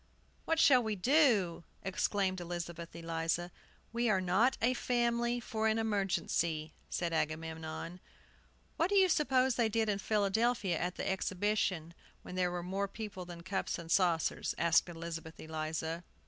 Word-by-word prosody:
"What 325 0 +1
shall 255 -5 +7
we 220 -2 -2
do?" 210 - +3 0.2
exclaimed 190 -1 0
Elizabeth 170 -1 -6
Eliza. 165 +1 -2 0.4
"We 235 0 +1
are 195 -3 +3
not 190 +8 +2
a 245 +2 +3
family 240 -1 +1
for 220 -2 -1
an 220 0 +2
emergency," 185 -7 0 0.2
said 170 -2 -2
Agamemnon. 160 +2 -3 0.8
"What 335 - +2
do 405 - +1
you 385 -1 +6
suppose 265 -6 +2
they 230 -2 +3
did 220 0 +1
in 200 -1 0
Philadelphia 210 -1 +1
at 180 +1 -2
the - - -3
Exhibition, 190 -3 0 0.3
when - - -9
there 180 -1 +1
were 175 0 -4
more 195 +3 -1
people 200 -3 -7
than 170 -1 -9
cups 190 +1 -2
and 170 -1 -8
saucers?" 170 -4 +2
asked 170 +1 +3
Elizabeth 165 -1 -7
Eliza. 160 +1 -3
185 Hz, 150 wpm, -33 LUFS, 170-225 Hz, 0.8 s, shall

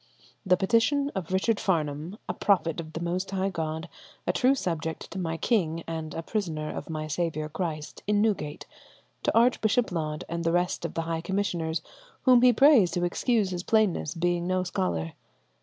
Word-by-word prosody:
"The 180 -3 +4
petition 235 +9 +2
of 185 -3 -4
Richard 200 +3 +1
Farnham, 160 +1 -1
a - - -1
prophet 175 -5 +1
of 160 -1 -7
the 165 - -4
most 175 +3 -2
high 195 0 0
God, 160 0 -3 0.4
a - - +1
true 260 +1 +3
subject 165 - -3
to 190 - -5
my 165 -2 -2
king, 165 -4 0
and 160 -1 -5
a 165 - -4
prisoner 160 -7 -2
of - - -6
my 155 -1 -3
saviour 155 0 -2
Christ, 155 -2 -4
in 210 0 +3
Newgate, 190 -9 -1 0.6
to - - +1
Archbishop 235 -1 +3
Laud 155 -3 -2
and 170 0 -3
the 165 - +2
rest 175 +1 0
of - - -5
the 165 - -1
high 165 0 -2
commissioners, 170 -4 -1 0.4
whom 250 -2 +6
he 250 0 +7
prays 245 - +6
to 175 - 0
excuse 210 +2 +1
his 175 -1 -3
plainness, 210 -7 +1
being 175 +1 0
no 185 0 +1
scholar. 85 - -2
175 Hz, 180 wpm, -27 LUFS, 160-205 Hz, 0.6 s, he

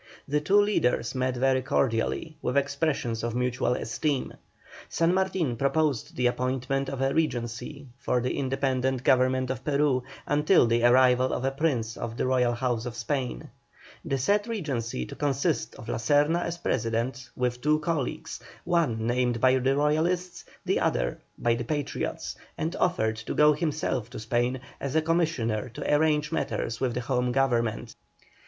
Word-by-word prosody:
The 150 +1 +1
two 195 +7 +4
leaders 205 - +1
met 130 -1 -1
very 130 +1 +2
cordially, 130 +5 0
with 125 +2 -1
expressions 140 -5 0
of 120 0 -2
mutual 125 0 0
esteem. 140 +4 -2 0.6
San 165 +2 +2
Martin 185 -8 0
proposed 140 +1 0
the 125 - 0
appointment 130 +2 0
of 135 -1 -4
a 135 - +1
regency 140 -1 -2
for 125 - 0
the 125 +1 -1
independent 130 -1 0
government 130 0 +3
of 130 0 -5
Peru, 140 -3 +2 0.2
until 150 +2 +4
the 115 0 +1
arrival 125 +1 +5
of 130 - -2
a 135 - +1
prince 135 -6 -1
of 115 0 -5
the - - 0
Royal 125 -2 +2
House 120 -1 -1
of 120 - -6
Spain; 125 - -3 0.5
the 135 - -1
said 205 - +1
regency 130 - -3
to - - -9
consist 145 0 -1
of 110 - -11
La - - -2
Serna 145 +8 +2
as 170 0 -3
President, 120 -3 -2
with 125 -1 -1
two 150 +2 +3
colleagues, 155 -3 -3 0.2
one 155 -11 +1
named 120 0 +1
by 130 +1 +4
the 135 +2 +2
Royalists, 165 +5 0 0.2
the - - +1
other - - 0 0.2
by 120 - +2
the 120 +1 -2
Patriots, 145 +3 -3 0.2
and 160 +3 -2
offered 110 -11 +1
to 115 - -5
go 150 0 +6
himself 150 -6 -2
to 125 - -8
Spain 120 +3 -1 0.2
as 140 +1 -4
a 160 - +4
commissioner 155 -9 0
to 120 - -2
arrange 150 0 +2
matters 115 -7 -2
with 125 -3 0
the 125 - -1
Home 125 0 0
Government. 120 -4 0
130 Hz, 160 wpm, -27 LUFS, 120-150 Hz, 0.6 s, go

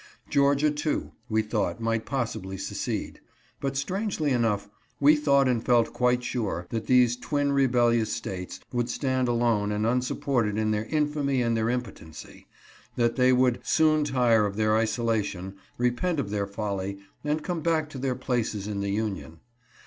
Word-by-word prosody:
Georgia, 140 +1 +3
too, 150 +1 -2 0.2
we 110 0 +2
thought 110 +1 -1
might 115 -1 -1
possibly 110 -6 -3
secede. 95 +1 -4 0.4
But, 135 -1 -2
strangely 180 0 -1
enough, 115 -5 +1 0.3
we 145 +2 +6
thought 140 -2 +3
and 120 -3 +1
felt 120 -2 +3
quite 125 0 +1
sure 110 -9 -2
that 115 -1 -3
these 125 -2 +4
twin 140 +3 -1
rebellious 120 -5 +2
States 90 -4 -5
would 120 0 0
stand 130 -2 0
alone 115 -4 +1
and 105 +1 0
unsupported 125 -2 0
in 110 0 +1
their 105 +1 -1
infamy 145 -3 0
and 115 -1 +1
their 110 0 0
impotency, 120 -10 -6 0.5
that 120 -1 +1
they 130 -1 +4
would 125 -1 +3
soon 155 -1 +3
tire 120 -6 +3
of 100 - -6
their 110 0 +2
isolation, 110 -4 -1 0.2
repent 125 +8 0
of 105 -7 -3
their 100 -1 -1
folly, 100 -1 -3 0.3
and 150 +1 -1
come 175 -3 -3
back 160 -1 +1
to 135 - -7
their 130 -1 -1
places 120 -5 -2
in 105 -1 -3
the 100 0 -2
Union. 100 -6 -3
120 Hz, 160 wpm, -27 LUFS, 110-140 Hz, 0.5 s, we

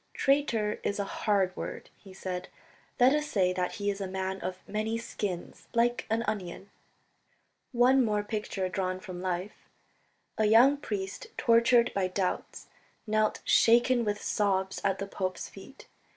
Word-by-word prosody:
"Traitor 235 -7 +1
is 200 - -1
a 200 - 0
hard 195 -2 0
word," - - -7
he 195 - -15
said, 185 -1 -5 0.5
"let 250 +2 +6
us 300 0 0
say 185 -6 +1
that 180 -1 -2
he 205 0 -1
is 200 0 -6
a 195 - -2
man 190 0 -3
of 185 0 -6
many 215 +2 -2
skins 180 -6 -5
like 240 +1 +1
an 225 +1 +1
onion... 200 -3 -4 0.5
." - - -42 0.2
One 255 +1 +4
more 210 -2 0
picture 205 -3 -3
drawn 185 0 -2
from 185 -2 -8
life. 185 +2 -4 0.7
A 215 - +4
young 240 +7 +6
priest, 195 -8 -5
tortured 235 +1 +4
by 195 -2 +1
doubts, 185 0 -3 0.4
knelt 215 -1 +1
shaken 240 +1 +4
with 210 -1 -1
sobs 190 -2 0
at 195 -1 +1
the 195 - -3
pope's 185 -2 -4
feet. - - -13
205 Hz, 155 wpm, -29 LUFS, 190-230 Hz, 0.7 s, let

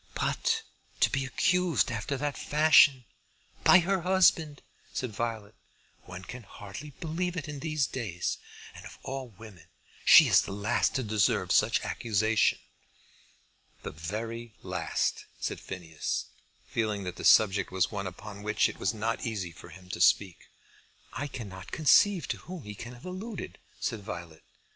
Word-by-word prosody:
"But - - 0 0.4
to - - +4
be 135 0 0
accused 165 - +1
after 115 +5 -3
that 145 0 -2
fashion, 145 -4 +5 0.6
by - - +8
her 190 +1 0
husband!" 170 -5 +3 0.3
said 125 -3 -3
Violet. 110 -1 -4 0.5
"One 90 +1 -9
can 125 +6 -8
hardly 105 +7 -9
believe 175 +2 -2
it 155 - -4
in 150 -1 -6
these 155 -1 0
days. 100 -11 -3 0.3
And - - -12
of - - -11
all 135 -1 -5
women 105 -4 -14 0.4
she - - +9
is - - +6
the - - -6
last 100 +1 0
to 130 - 0
deserve 105 -3 +1
such - - +3
accusation." 110 0 +1 1.3
"The - - -5
very 110 +8 -6
last," - - -2
said - - -3
Phineas, 80 -4 -4 0.4
feeling 105 -3 -2
that 90 -1 -6
the - - -7
subject 100 -2 +5
was 90 -1 +1
one 100 -2 -3
upon 100 +3 -9
which 105 0 +2
it - - -8
was 110 - 0
not 110 +2 -2
easy 100 -7 -3
for 85 +1 -13
him 90 +2 -14
to 85 - -4
speak. 95 -1 +3 0.7
"I 145 - -3
cannot 95 -8 -8
conceive 175 +4 +4
to - - -1
whom 180 -3 -9
he 105 - -7
can 120 +4 -9
have 120 - -14
alluded," 190 +3 -6 0.2
said 110 -3 -3
Violet. 85 -5 -8
115 Hz, 155 wpm, -29 LUFS, 100-145 Hz, 1.3 s, she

